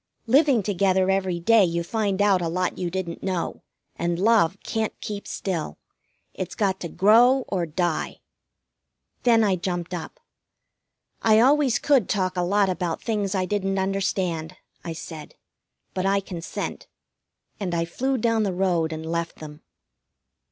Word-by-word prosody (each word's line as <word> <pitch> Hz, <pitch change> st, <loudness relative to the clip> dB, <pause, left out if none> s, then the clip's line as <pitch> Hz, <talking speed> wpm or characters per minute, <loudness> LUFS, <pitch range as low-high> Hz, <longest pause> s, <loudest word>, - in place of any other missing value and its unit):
Living 265 Hz, -2 st, +4 dB
together 190 Hz, -1 st, +2 dB
every 190 Hz, -2 st, 0 dB
day 220 Hz, +4 st, +5 dB
you 170 Hz, -1 st, 0 dB
find 205 Hz, +1 st, 0 dB
out 195 Hz, -3 st, +3 dB
a 170 Hz, -, -1 dB
lot 180 Hz, +2 st, -1 dB
you 180 Hz, -, -1 dB
didn't 175 Hz, -2 st, -4 dB
know, 185 Hz, -3 st, -3 dB, 0.3 s
and 170 Hz, 0 st, -1 dB
love 200 Hz, -2 st, +3 dB
can't 220 Hz, -1 st, -3 dB
keep 205 Hz, -1 st, -6 dB
still. 175 Hz, -6 st, -3 dB, 0.6 s
It's -, -, -5 dB
got 195 Hz, -3 st, 0 dB
to 170 Hz, -, -4 dB
grow 240 Hz, +8 st, +5 dB
or 180 Hz, -4 st, -1 dB
die." 170 Hz, +1 st, -2 dB, 1.0 s
Then 230 Hz, -2 st, +4 dB
I 195 Hz, -3 st, +2 dB
jumped 175 Hz, 0 st, -3 dB
up. 175 Hz, -2 st, -6 dB, 1.0 s
"I 220 Hz, -1 st, +5 dB
always 265 Hz, 0 st, +4 dB
could 270 Hz, -9 st, +2 dB
talk 185 Hz, -3 st, 0 dB
a 180 Hz, -, 0 dB
lot 200 Hz, +3 st, +2 dB
about 180 Hz, -2 st, -2 dB
things 205 Hz, -4 st, -1 dB
I 185 Hz, -1 st, +1 dB
didn't 195 Hz, 0 st, -1 dB
understand," 185 Hz, -3 st, -1 dB, 0.3 s
I 170 Hz, -, -4 dB
said. 160 Hz, -1 st, -9 dB, 0.6 s
"But 185 Hz, 0 st, -1 dB
I 200 Hz, 0 st, +3 dB
consent." 180 Hz, -3 st, -6 dB, 0.7 s
And 180 Hz, -4 st, -2 dB
I 165 Hz, 0 st, 0 dB
flew 260 Hz, +10 st, -1 dB
down 230 Hz, -1 st, +1 dB
the 195 Hz, -4 st, -1 dB
road 175 Hz, -4 st, +1 dB
and 160 Hz, 0 st, -5 dB
left 170 Hz, 0 st, -3 dB
them. 150 Hz, -1 st, -11 dB
190 Hz, 150 wpm, -24 LUFS, 175-210 Hz, 1.0 s, day